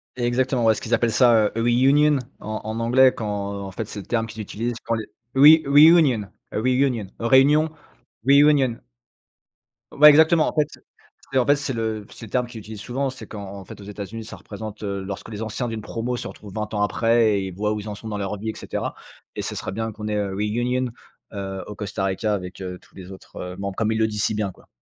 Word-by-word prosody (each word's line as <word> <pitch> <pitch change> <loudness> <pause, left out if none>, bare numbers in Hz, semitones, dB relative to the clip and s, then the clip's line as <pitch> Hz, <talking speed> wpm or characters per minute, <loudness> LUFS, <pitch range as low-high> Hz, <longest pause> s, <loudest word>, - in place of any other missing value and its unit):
Exactement, 125 0 0
ouais 110 - +6
ce - - -7
qu'ils - - -3
appellent 120 -1 +2
ça, 115 -2 +5
heu, 115 - 0
reunion 135 +5 +4 0.2
en 110 0 -5
en 110 +1 -4
anglais 130 +3 +5
quand, 100 -2 -4
en 95 - -7
fait, 110 +4 -4
c'est 105 - -7
le 100 - -9
terme 115 -1 -1
qu'ils 110 0 -7
utilisent 115 +3 -3
quand 115 - -1
les 110 - -4 0.3
re 145 +1 +7
reunion 145 -6 +6 0.3
a - - -3
reunion 125 -3 +1
réunion 135 +6 +4 0.6
reunion. 140 -3 +5 1.1
Ouais, 150 +1 +8
exactement. 160 +2 +5
En - - -2
fait, 150 -1 +2 0.6
c'est 135 - +3
en 125 - +2
fait, 145 - +6
c'est 140 -2 -3
le 110 -2 -3
c'est 115 - -10
le 105 - -13
terme 125 -1 +1
qu'ils 120 -2 -9
utilisent 105 0 -9
souvent. 135 +4 -2
C'est 130 - -9
qu'en 105 - -8 0.2
en 95 - -11
fait 100 - -11
aux - - -10
États-Unis, 105 +2 -7
ça 110 - -9
représente, 110 0 -9
heu, 100 -1 -3
lorsque 100 +3 -7
les 105 -1 -6
anciens 110 +3 -3
d'une 115 -1 -4
promo 120 +4 -3
se - - -5
retrouvent 100 -2 -11
20 105 0 -4
ans 105 - 0
après 115 -1 +2
et 95 -1 -4
voient 105 +3 -1
où 105 - -3
ils 105 - -7
en 105 - -5
sont 110 - -10
dans 105 - -3
leur 100 +1 -3
vie 110 +3 -4
et - - -14
cetera - - -4 0.4
et - - -3
ce - - -4
serait - - -4
bien 110 +2 -3
qu'on 105 0 -7
ait, 105 - -1
heu, 100 -2 -1
reunion 120 +5 -1 0.4
heu, 95 -2 -5
au 105 - -6
Costa 100 -2 -4
Rica 100 +3 -1
avec, 90 -1 -7
heu, 90 -1 -5
tous - - -25
les 95 0 -10
autres, 95 - -13
heu, 90 0 -6
membres, 100 -1 -4
comme 110 +1 0
ils 110 - 0
le 110 - +3
disent 105 -1 -3
si - - 0
bien, 105 -3 -1
quoi. - - -22
110 Hz, 235 wpm, -23 LUFS, 105-125 Hz, 1.1 s, Ouais